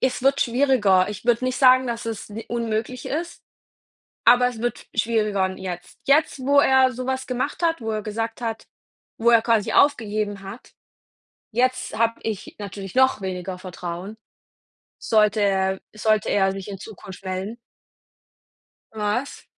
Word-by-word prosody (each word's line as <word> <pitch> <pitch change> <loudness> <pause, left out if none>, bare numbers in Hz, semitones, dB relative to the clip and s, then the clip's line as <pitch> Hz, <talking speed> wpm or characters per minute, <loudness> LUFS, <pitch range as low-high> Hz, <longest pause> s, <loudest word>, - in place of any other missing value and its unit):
es 255 -1 0
wird 275 +1 +3
schwieriger. 230 -7 +3
Ich 210 +1 -7
würde 240 +1 +2
nicht 255 0 -1
sagen, 255 -1 +6
dass 235 -1 -4
es 225 -3 -5
ni 220 +2 -7
unmöglich 235 +1 -3
ist, 335 +4 -4 0.8
aber 245 +1 +6
es 235 -3 -8
wird 240 0 -3
schwieriger 215 -3 +1
n 185 - -6
jetzt. 180 -2 -7
Jetzt, 285 0 +3
wo 280 +2 +3
er 265 -1 +4
so 255 +1 -6
was 260 0 -2
gemacht 255 +6 -3
hat, 330 -4 +1
wo 225 - -3
er 215 -1 -2
gesagt 225 +2 -4
hat, 225 -2 -4 0.5
wo 235 +1 +4
er 230 -1 +6
quasi 225 -3 +1
aufgegeben 210 -7 +2
hat, 195 +5 -10 0.8
jetzt 255 +3 0
habe 230 0 +1
ich 215 -3 -5
natürlich 200 -2 -7
noch 260 -4 +4
weniger 185 -1 -4
Vertrauen, 180 +2 -7 0.8
sollte 210 -1 +2
er 190 -1 +1 0.2
sollte 215 -1 +1
er 195 -1 +3
sich 195 -1 -7
in 195 -2 -7
Zukunft 195 -2 -11
melden. 190 +4 -4 1.4
Was? 215 +6 -2
225 Hz, 155 wpm, -23 LUFS, 200-250 Hz, 1.4 s, sagen